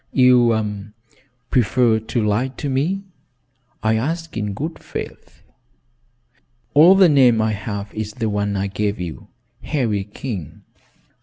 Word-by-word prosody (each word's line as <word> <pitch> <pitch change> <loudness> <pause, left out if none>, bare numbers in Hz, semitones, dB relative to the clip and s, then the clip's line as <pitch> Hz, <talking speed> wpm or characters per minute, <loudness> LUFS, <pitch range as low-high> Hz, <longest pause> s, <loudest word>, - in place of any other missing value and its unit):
"You 110 -5 +2 0.6
prefer 120 -1 +3
to 110 0 -2
lie 105 +5 +1
to 135 +2 -6
me? 160 +9 -1 0.8
I 110 0 +2
ask 165 +7 -3
in 105 -2 -3
good 155 +9 -5
faith." - - -9 1.3
"All 165 +6 +7
the 190 -1 +6
name 130 -7 +5
I 110 0 +1
have 100 0 -5
is 110 -1 -5
the 115 -1 -2
one 105 -1 -1
I 95 - -1
gave 100 +1 -2
you, 85 -3 -7 0.3
Harry 115 -9 -1
King." 105 - -7
110 Hz, 130 wpm, -20 LUFS, 105-130 Hz, 1.3 s, All